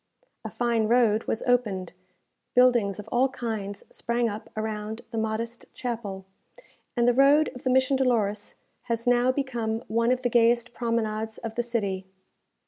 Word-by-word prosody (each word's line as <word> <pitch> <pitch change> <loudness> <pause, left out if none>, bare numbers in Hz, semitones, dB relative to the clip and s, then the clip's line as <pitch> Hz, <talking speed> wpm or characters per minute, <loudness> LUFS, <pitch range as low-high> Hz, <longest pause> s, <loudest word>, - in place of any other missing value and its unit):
A - - -5
fine 235 -2 0
road 230 -2 +3
was 225 - -2
opened, 215 -8 0 0.6
buildings 240 -6 +4
of 210 - -8
all 255 +2 +3
kinds 215 -5 -4
sprang 235 0 0
up 210 0 -6
around 215 0 -4
the 230 - -4
modest 225 +2 -3
chapel, 215 -6 -4 0.7
and 240 0 +3
the 245 - +5
road 280 +4 +5
of 250 - -10
the 260 - -1
Mission 260 +1 +3
Dolores 220 -6 0 0.3
has 230 0 -2
now 245 +1 +4
become 240 -5 -2
one 230 +2 +2
of 255 0 +1
the 245 - +2
gayest 235 0 +3
promenades 220 -2 -2
of 225 -1 -6
the 240 - 0
city. 200 -6 -2
230 Hz, 155 wpm, -26 LUFS, 215-245 Hz, 0.7 s, the